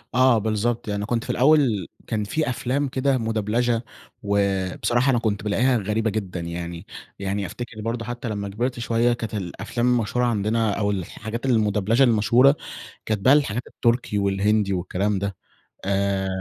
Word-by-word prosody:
آه، 130 -2 +5
بالضبط. 110 +2 -1
يعني 105 0 -2
كنت 115 +1 -1
في - - -11
الأول 125 - +3 0.2
كان 110 -2 -1
في 150 +8 -1
أفلام 130 +3 -1
كده 135 +1 +1
مدبلچة، 115 +1 0 0.4
وبصراحة 100 +5 +1
أنا 120 - +3
كنت 105 -3 -1
بالاقيها 120 +5 +2
غريبة 110 +2 0
جدًا 95 -4 -3
يعني، 85 +1 -6 0.3
يعني 100 +1 -2
أفتكر 115 +2 -7
برضه 115 +1 -3
حتى 120 0 -5
لمّا 100 -2 -3
كبرت 120 +5 -2
شوية 120 +1 +2
كانت 115 -2 -5
الأفلام 105 +5 -3
المشهورة 125 0 +1
عندنا 110 -1 +1
أو 105 -1 +1
الحاجات 110 +5 -5
المدبلچة 110 0 +2
المشهورة، 120 +4 +5 0.5
كانت 110 -2 0
بقى 130 +7 +5
الحاجات 125 -5 +1
التركي 115 -3 0
والهندي 100 +1 +1
والكلام 95 +2 -1
ده. 100 0 -3 0.5
آآ 100 0 0
110 Hz, 150 wpm, -23 LUFS, 100-120 Hz, 0.5 s, آه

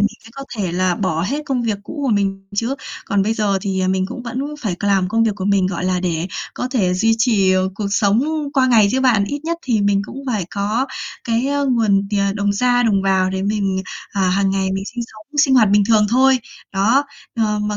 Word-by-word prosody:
mình 205 - +4 0.2
sẽ 225 - -13
có 275 +2 -8
thể 185 -5 -2
là 180 0 +1
bỏ 170 -4 -1
hết 280 - -2
công 255 -3 -1
việc 215 -3 -1
cũ 290 +8 -7
của - - +1
mình 195 -1 -1
chứ. 230 +6 -1 0.3
Còn 200 -1 +1
bây 220 +3 0
giờ 205 -3 +1
thì, 190 -1 -2
à, 185 - +1
mình 190 0 +1
cũng 245 +2 -7
vẫn 240 +1 -5 0.2
phải 210 -9 -2
c 180 - -7
làm 195 -2 +2
công 225 +3 +2
việc 225 - +2
của 185 - -4
mình, 200 -2 +2
gọi 185 -1 -3
là, 185 -1 0
để 175 -1 -1 0.3
có 250 - -3
thể 200 -9 +1
duy 225 +4 +2
trì, 215 -5 +3
ờ, 185 0 +2
cuộc 205 0 -3
sống 205 +3 +2 0.3
qua 265 -3 +3
ngày 225 -5 +5
chứ 260 - +1
bạn, 240 -6 +3
ít 285 +8 -4
nhất 335 +1 -1
thì 235 -5 +1
mình 200 0 +2
cũng - - -10
phải 215 -7 -1
có 210 +6 -1 0.4
cái 230 +2 0
á 285 +1 0
nguồn 210 -5 +2
tiền, 200 -1 +1
đồng 205 0 +1
ra 245 +3 +2
đồng 205 -4 +2
vào 190 -1 +2
để 190 0 -2
mình, 195 -2 -1 0.3
à, 195 - -2
hàng 195 +1 +2
ngày 190 0 0
mình 195 0 -3
sinh 240 -1 -3
sống, 215 -1 -15 0.2
sinh 265 -2 +2
hoạt 225 -5 +5
bình 205 0 +5
thường 215 -2 +4
thôi. 260 +3 +4 0.3
Đó, 225 +9 +3 0.3
ờ, 215 -2 +1
mà 210 0 -2
205 Hz, 245 wpm, -19 LUFS, 195-235 Hz, 0.4 s, ngày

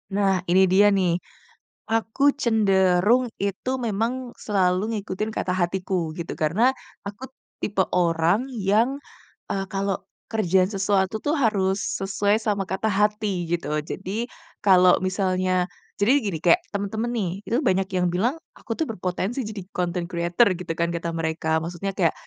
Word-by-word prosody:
Nah 195 -2 +1
ini 190 +2 +6
dia 195 +3 +5
nih, 180 -3 +1 0.7
aku 225 +3 -1 0.2
cenderung 210 +1 +3
itu 200 +5 -2
memang 240 +2 -2
selalu 195 +2 0
ngikutin 205 +1 -3
kata 180 - -1
hatiku 180 -1 -1
gitu. 170 - -4
Karena, 210 +12 +2 0.3
aku 225 +7 -7 0.3
tipe 195 -2 +1
orang 175 +8 +2
yang, 225 +4 +1 0.5
eee, 195 -1 -1
kalau 195 -1 -1 0.4
kerjain 190 -4 +3
sesuatu 195 +1 0
tuh 295 - +1
harus 200 -6 +2 0.2
sesuai 200 +2 +1
sama 205 -3 0
kata 195 +4 -1
hati 210 -3 0
gitu. 170 -4 -1 0.2
Jadi, 200 +5 -3 0.4
kalau 185 -2 +6
misalnya 185 -1 0 0.3
jadi 205 +5 +4
gini 190 -6 -2
kayak 170 - +6
teman-teman 205 +3 -2
nih, 210 -6 0 0.2
itu 235 - 0
banyak 190 0 +2
yang 180 0 +2
bilang 230 +9 +1 0.2
aku 230 - -6
tuh 320 - +1
berpotensi 190 +3 -3
jadi 210 -2 -6
content 175 -1 -1
creator 175 +6 +2
gitu 180 -2 -4
kan, 170 - +2
kata 170 0 -3
mereka. 160 -1 -2
Maksudnya 175 +4 -4
kayak 170 -5 +3
195 Hz, 145 wpm, -24 LUFS, 180-215 Hz, 0.7 s, ini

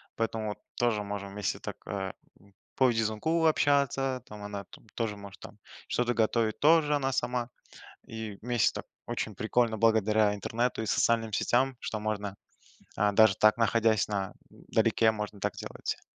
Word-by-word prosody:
Поэтому 110 -1 -2
вот 105 - -5 0.2
тоже 115 -4 +1
можем 100 -1 -5
вместе 105 -1 -2
так, - - -6
э, 95 -2 -4 0.3
п 100 +1 -22 0.2
по 130 - +4
видеозвонку 115 +9 0
общаться, 140 -4 +2
там 105 -1 -10
она 100 -2 -6 0.3
тоже 110 -3 -2
может 100 -1 -11
там - - -12 0.3
что-то 120 0 0
готовить, 110 -1 +1
тоже 150 -1 +5
она 135 -2 0
сама. 125 -2 -1 0.6
И 110 -3 -6
вместе 120 -1 +2
так, - - -5 0.2
очень - - -3
прикольно 115 +1 +1
благодаря 110 -1 +3
интернету 115 +4 -1
и 110 - -4
социальным 115 +1 +1
сетям, 130 +5 +1
что 110 - -4
можно, 105 -2 -3 0.6
а, 105 0 +3
даже 110 -1 +5
так, 110 +1 +5
находясь 115 -1 +2
на 100 -2 -3 0.2
далеке, 110 0 +1
можно 105 -1 -5
так - - -1
делать. - - -5
110 Hz, 155 wpm, -29 LUFS, 105-120 Hz, 0.6 s, тоже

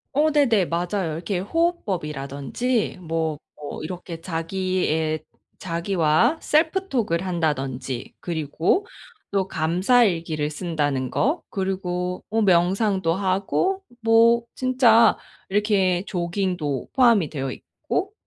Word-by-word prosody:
어 305 +2 +4
네네, 235 -11 +3
맞아요. 175 0 -2
이렇게 175 +4 -3
호흡법이라든지 190 - -1
뭐 160 -2 -2 0.2
뭐 150 0 -7
이렇게 175 0 -6
자기의 165 -2 -1 0.3
자기와 170 - +1
self 340 +5 +1
talk을 190 -8 0
한다든지 135 -8 -2
그리고 165 - 0 0.5
또 195 -1 0
감사 185 +9 +3
일기를 165 -6 -1
쓴다는 145 -6 -1
거. 295 +9 0
그리고 180 -2 -3
뭐 225 +1 +1
명상도 190 -1 +2
하고 200 - 0 0.2
뭐 230 +1 +5
진짜 250 -3 +4 0.3
이렇게 195 -3 +2
조깅도 175 -7 -2
포함이 230 - +4
되어 135 -3 -3
있고 395 +2 -4
185 Hz, 255 characters per minute, -23 LUFS, 160-225 Hz, 0.5 s, 뭐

